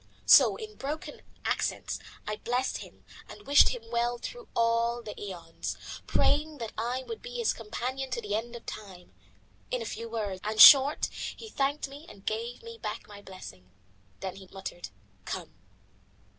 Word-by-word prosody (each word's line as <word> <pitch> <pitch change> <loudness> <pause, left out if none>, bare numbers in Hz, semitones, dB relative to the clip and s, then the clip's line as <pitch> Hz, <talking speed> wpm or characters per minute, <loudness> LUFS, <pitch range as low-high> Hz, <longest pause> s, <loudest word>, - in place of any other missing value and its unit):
So - - +8
in 430 -1 -8
broken 295 +3 -5 0.2
accents - - -1 0.3
I 210 0 -3
blessed 250 +4 -1
him - - -13 0.2
and 410 - -11
wished 285 +1 +7
him 245 -2 -5
well 240 +1 +1
through - - -8
all 235 +1 +2
the 210 - -6
aeons, 175 -5 -5 0.3
praying 300 +1 +2
that 230 -4 -5
I 245 +4 -2
might 450 +10 -7
be - - -7
his 470 -2 +2
companion 255 +4 -4
to 245 -1 -2
the 210 -3 -4
end 230 +3 -2
of 235 - -10
time. 190 -4 -9 0.6
In 245 -2 -2
few 230 +1 -5
words 205 -5 -3
and 215 +1 -2
short 280 +4 +10 0.3
he 445 - -10
thanked 280 -3 0
me 285 +4 -11
and 195 -1 -14
gave 230 - -3
me 460 0 -9
back - - -5
my 205 -1 -11
blessing. 140 - -11 0.5
Then 190 0 -4
he 190 -1 -12
muttered 190 -2 -7 0.4
"Come." - - -5
235 Hz, 165 wpm, -29 LUFS, 210-275 Hz, 0.6 s, short